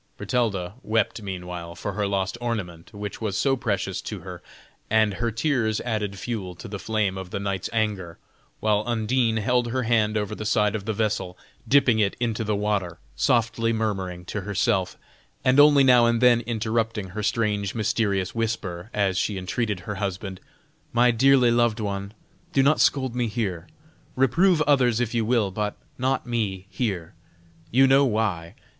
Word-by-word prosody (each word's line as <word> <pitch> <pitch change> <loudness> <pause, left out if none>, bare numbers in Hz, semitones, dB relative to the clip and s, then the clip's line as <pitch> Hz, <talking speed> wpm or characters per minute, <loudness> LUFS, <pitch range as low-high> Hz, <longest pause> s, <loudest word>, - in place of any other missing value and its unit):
Bertalda 100 -7 -1
wept 110 -1 0
meanwhile 90 -3 -6
for 100 +5 -4
her 105 0 -1
lost 100 0 -1
ornament, 95 -9 -4
which 105 +1 -7
was 105 -2 -2
so 135 -1 +2
precious 110 -6 -2
to - - -6
her, - - -9 0.5
and 110 -1 +3
her 105 +6 -1
tears 115 -2 0
added 105 -4 -2
fuel 95 -4 -4
to - - -9
the 100 0 -6
flame 105 -3 -1
of 95 -1 -7
the 100 - -4
knight's 100 -2 -3
anger, 105 -7 -2 0.4
while 105 -1 +2
Undine 115 0 +1
held 120 +3 +1
her 130 +1 0
hand 110 -2 +2
over 105 0 -2
the 110 - -5
side 105 -1 +2
of 105 -3 -4
the 110 - -1
vessel, 100 -4 -2 0.3
dipping 130 -5 +4
it 100 -2 +1
into 115 -2 -1
the 105 -1 0
water, 100 -4 -1 0.2
softly 115 - +1
murmuring 95 -6 -2
to 105 - -4
herself, 100 0 0 0.5
and 130 +2 +4
only 145 -1 +7
now 125 -2 +6
and 115 0 +2
then 120 -1 +5
interrupting 110 -3 -1
her 105 +4 -5
strange 105 -2 0
mysterious 105 -4 0
whisper, 105 -5 -3
as 95 -2 +1
she 105 - -1
entreated 95 +1 -2
her 105 +4 -5
husband: 95 -1 -4 0.5
"My 120 +1 +5
dearly 130 +1 +4
loved 120 -1 +2
one, 100 0 -4 0.4
do 135 - +4
not 150 +3 +3
scold 130 -3 +2
me 120 -1 0
here; 100 -6 -3 0.5
reprove 155 +6 +3
others 125 -6 +3
if 120 -2 -1
you 115 -1 +1
will, 110 -3 +1
but 105 +1 -2 0.2
not 130 +2 0
me 105 -6 -2
here. 95 -5 -3 0.6
You 135 +3 +5
know 135 +1 +5
why!" 105 -9 -1
110 Hz, 170 wpm, -25 LUFS, 100-120 Hz, 0.6 s, only